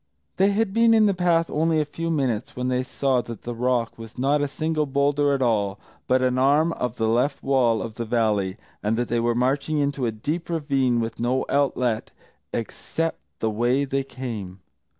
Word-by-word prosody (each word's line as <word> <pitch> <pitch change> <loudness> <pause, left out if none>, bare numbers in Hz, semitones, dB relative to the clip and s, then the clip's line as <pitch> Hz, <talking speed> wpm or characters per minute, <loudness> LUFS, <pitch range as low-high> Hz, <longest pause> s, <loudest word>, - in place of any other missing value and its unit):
They 195 +1 +4
had 205 -1 0
been 230 0 +5
in 220 -1 +5
the 200 - +3
path 170 -2 +1
only 160 +1 +2
a 150 - +1
few 165 +3 -4
minutes 130 -8 -1
when 125 0 -2
they 125 0 +1
saw 130 -1 0
that 115 -3 -9
the 120 - -4
rock 120 -1 -1
was 115 0 -10
not 140 +3 +2
a 145 - +1
single 155 +1 -1
boulder 140 +1 +2
at 135 - 0
all, 100 -4 +1 0.3
but 130 0 +3
an 130 0 +1
arm 150 +5 +3
of 125 -5 -3
the 110 - 0
left 125 +5 +1
wall 125 -5 +2
of 115 - -6
the 115 +1 -4
valley, 105 -5 0 0.2
and 110 +2 0
that 120 0 -1
they 120 - +1
were 120 0 +1
marching 135 +5 0
into 140 -3 0
a - - 0
deep 150 +12 -4
ravine 135 -7 +1
with 115 0 -4
no 125 +2 0
outlet 125 -5 +1 0.4
except 165 +7 -3 0.2
the 110 - +1
way 120 +6 +1
they 135 0 -1
came. 115 -8 -7
130 Hz, 200 wpm, -24 LUFS, 115-145 Hz, 0.4 s, been